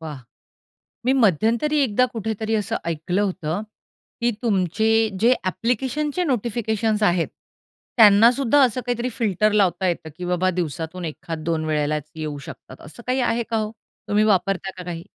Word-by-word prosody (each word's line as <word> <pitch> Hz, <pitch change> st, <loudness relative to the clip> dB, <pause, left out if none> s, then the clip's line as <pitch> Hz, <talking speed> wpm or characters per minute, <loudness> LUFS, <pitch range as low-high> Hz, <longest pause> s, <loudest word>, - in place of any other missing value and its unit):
वाह! 155 Hz, -4 st, -7 dB, 0.9 s
मी 260 Hz, -, +4 dB
मध्यंतरी 230 Hz, -, +2 dB
एकदा 250 Hz, +1 st, +2 dB
कुठेतरी 220 Hz, 0 st, -2 dB
असं 210 Hz, -3 st, -1 dB
ऐकलं 170 Hz, +4 st, -1 dB
होतं, 185 Hz, -2 st, -2 dB, 0.6 s
की 240 Hz, 0 st, +2 dB
तुमचे 210 Hz, -1 st, +1 dB, 0.3 s
जे 235 Hz, +5 st, +5 dB
ॲप्लिकेशनचे 265 Hz, -, -1 dB
नोटिफिकेशन्स 220 Hz, -, 0 dB
आहेत, 175 Hz, -3 st, +2 dB, 0.7 s
त्यांना 220 Hz, +2 st, +8 dB
सुद्धा 275 Hz, +2 st, +2 dB
असं 255 Hz, 0 st, +1 dB
काहीतरी 245 Hz, 0 st, -1 dB
फिल्टर 215 Hz, -2 st, +2 dB
लावता 195 Hz, -2 st, +2 dB
येतं, 165 Hz, -2 st, -2 dB
की 180 Hz, -, -5 dB
बाबा 180 Hz, +1 st, +1 dB
दिवसातून 170 Hz, +1 st, -4 dB
एखाद 160 Hz, 0 st, -6 dB
दोन 160 Hz, -2 st, -1 dB
वेळेलाच 150 Hz, -1 st, -1 dB
येऊ 155 Hz, -2 st, -4 dB
शकतात 130 Hz, -, -11 dB
असं 225 Hz, +10 st, -12 dB
काही 255 Hz, +1 st, +1 dB
आहे 235 Hz, -1 st, +1 dB
का 225 Hz, -, 0 dB
हो? 215 Hz, 0 st, -2 dB, 0.4 s
तुम्ही 210 Hz, +1 st, +3 dB
वापरता 195 Hz, -2 st, +1 dB
का 180 Hz, -, -6 dB
काही? 170 Hz, -1 st, -6 dB
205 Hz, 150 wpm, -22 LUFS, 170-235 Hz, 0.9 s, त्यांना